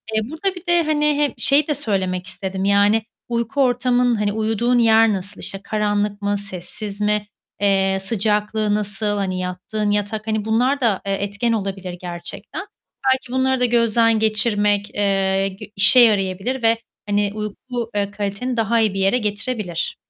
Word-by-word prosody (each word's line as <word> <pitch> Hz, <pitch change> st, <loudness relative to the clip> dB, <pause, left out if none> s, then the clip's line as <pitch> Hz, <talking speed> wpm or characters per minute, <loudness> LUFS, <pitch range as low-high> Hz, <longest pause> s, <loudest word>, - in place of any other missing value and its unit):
Eee, 220 Hz, -, +2 dB
burada 365 Hz, +5 st, -2 dB
bir 355 Hz, -, -10 dB
de 345 Hz, -1 st, +3 dB
hani, 300 Hz, -1 st, +1 dB
hep 290 Hz, -, 0 dB
şeyi 285 Hz, +2 st, +4 dB
de 300 Hz, -, 0 dB
söylemek 185 Hz, -5 st, -1 dB
istedim: 190 Hz, 0 st, -4 dB
Yani, 205 Hz, +2 st, +3 dB, 0.3 s
uyku 235 Hz, +4 st, -1 dB
ortamın, 245 Hz, -1 st, +2 dB
hani 210 Hz, -1 st, -1 dB
uyuduğun 225 Hz, +3 st, +1 dB
yer 225 Hz, -1 st, +5 dB
nasıl? 195 Hz, +1 st, -4 dB
İşte, 195 Hz, -, -3 dB
karanlık 205 Hz, -1 st, -1 dB
mı, 205 Hz, 0 st, 0 dB
sessiz 200 Hz, +2 st, -5 dB
mi, 210 Hz, 0 st, 0 dB, 0.3 s
eee, 195 Hz, -1 st, +2 dB
sıcaklığı 210 Hz, 0 st, +1 dB
nasıl? 210 Hz, 0 st, -1 dB
Hani, 185 Hz, -2 st, -2 dB
yattığın 185 Hz, +4 st, -3 dB
yatak 210 Hz, +1 st, -2 dB
hani 220 Hz, -1 st, -1 dB
bunlar 250 Hz, +5 st, +1 dB
da, 215 Hz, -5 st, +1 dB
eee, 195 Hz, -, -1 dB
etken 205 Hz, +4 st, -1 dB
olabilir 195 Hz, -4 st, -3 dB
gerçekten. 175 Hz, -, -5 dB, 0.5 s
Belki 260 Hz, -1 st, -6 dB
bunları 260 Hz, 0 st, +1 dB
da 250 Hz, -, +3 dB
gözden 230 Hz, -1 st, +3 dB
geçirmek, 210 Hz, -2 st, +1 dB
eee, 195 Hz, -1 st, +1 dB
g 195 Hz, +2 st, -11 dB
işe 200 Hz, +6 st, +6 dB
yarayabilir 210 Hz, +2 st, +2 dB
ve 225 Hz, 0 st, +4 dB, 0.3 s
hani, 205 Hz, 0 st, +1 dB
uyku, 225 Hz, +3 st, -5 dB
eee, 200 Hz, -1 st, -1 dB
kaliteni 205 Hz, +5 st, -3 dB
daha 225 Hz, +1 st, +2 dB
iyi 215 Hz, -3 st, +2 dB
bir 195 Hz, -, -3 dB
yere 195 Hz, +5 st, +3 dB
getirebilir. 210 Hz, -5 st, -3 dB
210 Hz, 160 wpm, -20 LUFS, 200-235 Hz, 0.5 s, işe